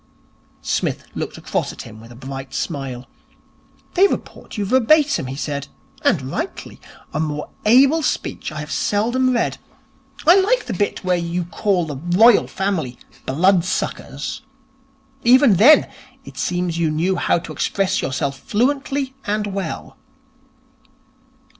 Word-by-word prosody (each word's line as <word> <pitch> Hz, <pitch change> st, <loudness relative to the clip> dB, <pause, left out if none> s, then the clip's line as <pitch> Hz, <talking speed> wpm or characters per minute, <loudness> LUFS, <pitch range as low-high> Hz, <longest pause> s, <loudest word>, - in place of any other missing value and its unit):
Psmith -, -, -1 dB
looked -, -, -5 dB
across -, -, -2 dB
at -, -, -9 dB
him 110 Hz, -1 st, -12 dB
with 115 Hz, +1 st, -13 dB
a -, -, -12 dB
bright 135 Hz, +2 st, -8 dB
smile. 135 Hz, -5 st, -4 dB, 0.9 s
'They 385 Hz, +2 st, +6 dB
report -, -, -6 dB
you 205 Hz, -, -1 dB
verbatim,' 260 Hz, -, +3 dB
he 130 Hz, -, -5 dB
said. 140 Hz, -1 st, -4 dB, 0.3 s
'And -, -, +2 dB
rightly. -, -, -5 dB, 0.3 s
A 150 Hz, -, -1 dB
more 150 Hz, -1 st, -3 dB, 0.2 s
able 270 Hz, +8 st, +6 dB
speech 275 Hz, -, -2 dB
I 155 Hz, 0 st, -5 dB
have 150 Hz, -, -8 dB
seldom 240 Hz, +5 st, +1 dB
read. 240 Hz, -, 0 dB, 0.7 s
I 345 Hz, +4 st, +7 dB
like 460 Hz, +6 st, +2 dB
the 230 Hz, -, -4 dB
bit 200 Hz, +2 st, -1 dB
where 185 Hz, -1 st, +2 dB
you 170 Hz, +1 st, -2 dB
call 180 Hz, 0 st, 0 dB
the 145 Hz, -3 st, -6 dB, 0.2 s
Royal 230 Hz, +1 st, +6 dB
Family 185 Hz, -10 st, -2 dB, 0.3 s
"blood 175 Hz, +6 st, +3 dB
suckers". 145 Hz, -5 st, -4 dB, 0.8 s
Even 245 Hz, -4 st, +6 dB
then, 265 Hz, -, +7 dB, 0.4 s
it -, -, -11 dB
seems 175 Hz, -2 st, -1 dB
you 165 Hz, -2 st, +2 dB
knew 170 Hz, +5 st, 0 dB
how -, -, +2 dB
to 165 Hz, -2 st, -7 dB
express 195 Hz, +6 st, 0 dB
yourself 135 Hz, +1 st, -2 dB
fluently 270 Hz, -, -1 dB
and 210 Hz, +1 st, 0 dB
well.' 195 Hz, -5 st, -5 dB
185 Hz, 140 wpm, -20 LUFS, 150-245 Hz, 0.9 s, I